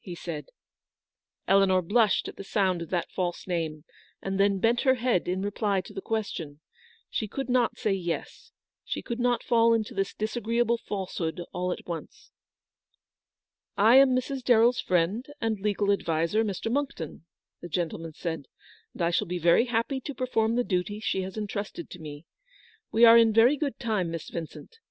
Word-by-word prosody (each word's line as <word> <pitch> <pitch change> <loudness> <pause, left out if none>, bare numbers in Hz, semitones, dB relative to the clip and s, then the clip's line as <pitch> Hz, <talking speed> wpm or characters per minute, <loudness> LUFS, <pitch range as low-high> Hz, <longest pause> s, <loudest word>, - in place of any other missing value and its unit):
" - - -41
he - - -5
said. 155 -4 -6 1.0
Eleanor 195 -1 +4
blushed 210 +4 +2
at - - -8
the - - -8
sound 190 -3 0
of 165 - -6
that 175 -2 -2
false 175 -2 -3
name, 160 -4 -3 0.4
and 195 0 -3
then 200 0 +3
bent 230 +5 +2
her 260 -1 +4
head 240 -7 0
in 185 +2 -1
reply 205 -1 0
to 185 - -9
the 195 - -5
question. 175 -10 -4 0.5
She 215 - -2
could 270 +6 -4
not 245 -2 +2
say 210 - 0
yes. 175 -3 -4 0.3
She - - -4
could 235 -1 -4
not 245 -1 +1
fall 230 -1 +4
into 220 -2 -2
this 195 0 -2
disagreeable 230 +2 0
falsehood 185 -6 -4
all 180 0 -1
at - - -5
once. 165 -3 -8 0.7
" - - -66 0.7
I 225 +5 +6
am 270 -2 +6
Mrs. 260 +1 -2
DarrelFs 240 0 +4
friend 185 +6 +1 0.2
and 225 -2 -1
legal 205 0 +1
adviser, 170 +2 +1
Mr. 210 +1 -3
Monckton/' 275 - -3 0.4
the 175 - -8
gentleman 165 -1 -3
said, 165 -5 -4 0.2
" - - -28
and - - -3
I 170 - +2
shall 205 +4 0
be 180 +1 -2
very 175 +7 +4
happy 245 +3 -1
to 285 +1 -6
perform 230 -2 0
the 245 - +2
duty 200 0 -2
she 195 -3 -1
has 190 +2 -6
entrusted 205 -4 -5
to 180 - -9
me. 150 0 -9 0.7
We 230 +2 +6
are 230 0 +9
in 225 -1 +4
very 235 +6 +6
good 290 -1 -3
time, 215 -8 -1
Miss 165 -1 -6
Vincent. 170 - -8
205 Hz, 185 wpm, -27 LUFS, 175-230 Hz, 1.0 s, are